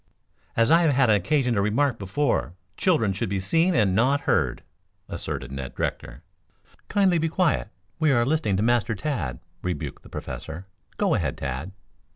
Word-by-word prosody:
"As 115 +5 +4
I 165 +1 +6
have 160 -4 +3
had 125 -4 +4
occasion 125 - +2
to 100 - +1
remark 115 +4 +1
before, 100 - -1 0.2
children 115 - +2
should 95 - -2
be 100 0 -1
seen 165 - +2
and 105 -5 +3
not 130 +8 +3
heard," - - 0 0.4
asserted 65 -1 -5
Ned 70 -2 -6
Rector. - - -4 0.7
"Kindly 190 -4 +3
be 160 +1 0
quiet. 165 - +1 0.3
We 155 -2 +3
are 120 -3 +3
listening 130 -9 +1
to 105 - +1
Master 120 -1 +2
Tad," 95 - -3 0.2
rebuked 90 -5 -4
the - - -15
Professor. 80 +4 -7 0.3
"Go - - +2
ahead, - - -1
Tad." 70 +7 -4
115 Hz, 165 wpm, -25 LUFS, 95-150 Hz, 0.7 s, I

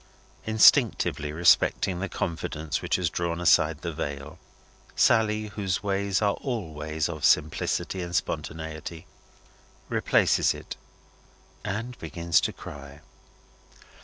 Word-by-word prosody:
Instinctively 110 -8 +4
respecting 85 +2 +3
the 100 +1 -3
confidence 80 -2 -3
which - - 0
has 90 -2 0
drawn 85 0 -2
aside 80 -2 +3
the 85 -2 -3
veil, 70 0 -6 0.6
Sally 110 -2 +2
whose 100 -3 -2
ways 100 0 0
are 100 -1 +3
all 115 - -4
ways 75 +1 -2
of 80 -3 -7
simplicity 80 +4 +1
and 85 0 -5
spontaneity 80 0 -4 0.8
replaces - - +2
it, - - -8 0.9
and 115 +5 -4
begins 85 +1 +1
to - - -1
cry. 70 0 -11
85 Hz, 110 wpm, -26 LUFS, 80-100 Hz, 0.9 s, Instinctively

